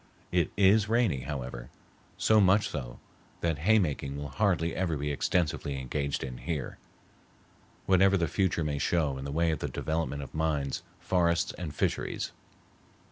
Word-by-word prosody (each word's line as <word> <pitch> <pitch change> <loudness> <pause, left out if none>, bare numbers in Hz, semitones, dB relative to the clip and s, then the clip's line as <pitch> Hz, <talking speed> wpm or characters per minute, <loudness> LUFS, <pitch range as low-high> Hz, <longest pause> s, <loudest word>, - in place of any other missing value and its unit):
It 90 -3 +1
is 105 +2 +5
rainy, 115 - +2
however,—so 65 - -2
much 100 +2 +4
so - - -6 0.4
that 80 -3 0
hay 110 +8 +4
making 70 -7 -1
will 70 0 -5
hardly 85 0 +1
ever 85 -4 0
be 75 +1 -2
extensively 75 -2 0
engaged 70 +2 -2
in 65 -2 -6
here, 80 -4 -4 1.1
whatever 95 +1 +5
the 85 -2 +1
future 90 0 0
may 75 -2 -1
show 75 -3 +1
in 65 - -6
the 70 - -4
way 80 +2 +2
of 80 - -2
the - - -3
development 80 -3 -2
of 70 - -11
mines, 75 -4 -1 0.2
forests, 85 -2 +1
and 80 -5 -6
fisheries. - - -1
80 Hz, 150 wpm, -29 LUFS, 70-90 Hz, 1.1 s, is